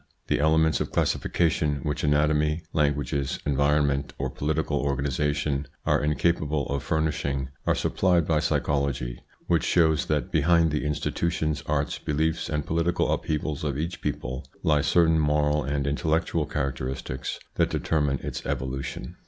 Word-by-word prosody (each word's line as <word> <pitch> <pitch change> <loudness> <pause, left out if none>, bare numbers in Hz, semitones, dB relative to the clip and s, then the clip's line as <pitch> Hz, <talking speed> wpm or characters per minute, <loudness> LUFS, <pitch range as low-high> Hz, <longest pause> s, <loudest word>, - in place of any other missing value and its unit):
The - - +2
elements 80 +1 +3
of - - -3
classification 80 -3 +1
which 75 -2 -2
anatomy, 75 +2 +2
languages, 70 -2 0
environment, 70 -1 +1
or - - -2
political 75 0 -1
organisation 70 +1 -1 0.2
are - - +2
incapable 75 -1 +1
of 70 -1 -1
furnishing 70 -4 -1 0.2
are - - +4
supplied 90 -4 +2
by 80 -1 +2
psychology, 70 -5 -1 0.3
which 85 -3 +2
shows 80 -3 +3
that 75 +4 -1
behind 85 0 +3
the 75 0 -1
institutions, 75 +1 -1
arts, 75 -1 -1
beliefs, 80 +2 -1
and 75 -2 -1
political 85 +2 +1
upheavals 75 -1 -2
of 70 -3 -1
each 85 +3 -3
people, 65 +1 -4 0.2
lie 75 -2 +3
certain 80 +1 +4
moral 75 0 +2
and 70 +1 -1
intellectual 80 +1 0
characteristics 65 -2 -3 0.2
that - - +2
determine 75 -4 0
its - - -4
evolution. 65 -1 -4
75 Hz, 135 wpm, -26 LUFS, 70-80 Hz, 0.3 s, are